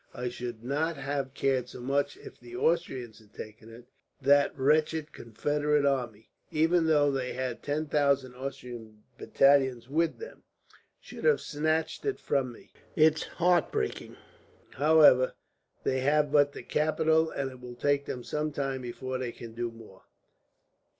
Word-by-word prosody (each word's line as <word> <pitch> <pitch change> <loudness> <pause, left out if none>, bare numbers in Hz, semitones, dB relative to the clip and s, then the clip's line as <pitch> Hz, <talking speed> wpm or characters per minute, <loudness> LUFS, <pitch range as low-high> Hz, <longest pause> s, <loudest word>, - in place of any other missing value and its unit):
I 125 -1 -3
should 120 -2 -7
not 150 +5 -1
have 135 -1 -3
cared 130 -2 0
so - - -10
much 140 - -1
if 415 - -13
the 360 - -11
Austrians 130 - -1
had 105 -1 -22
taken 110 +1 -10
it, 115 +1 -13 0.3
but 135 - -21
that 140 0 +5
that - - -19
wretched 155 +2 +1
Confederate 145 +5 0
army, 120 -6 -2 0.2
even 165 +2 +2
though 145 -2 +4
they 130 -2 -2
had 130 -2 -4
ten 150 +2 -2
Austrian 125 -5 -2 0.2
battalions 130 -4 +3
with 160 +4 0
them, 455 - -10 0.6
should - - -11
have 470 -2 +4
snatched 155 +2 -1
it 415 -2 -2
from 130 -3 -1
me, 120 - -16 0.2
is 155 0 +4
heart 180 0 +1
breaking. - - -3 0.5
However, 145 -3 +5 0.5
they 130 - 0
have 145 +2 +2
but 145 -1 +4
the - - -8
capital, 160 +1 +2
and 135 -3 -3
it 130 -1 -13
will 125 -1 -9
take 140 +2 +1
them 125 - -5
some 150 +3 -2
time 135 -2 -3
before 130 +1 -5
they 125 -2 -3
can 115 -1 -10
do 120 +1 -3
more." 115 -4 -15
140 Hz, 155 wpm, -29 LUFS, 125-150 Hz, 0.6 s, that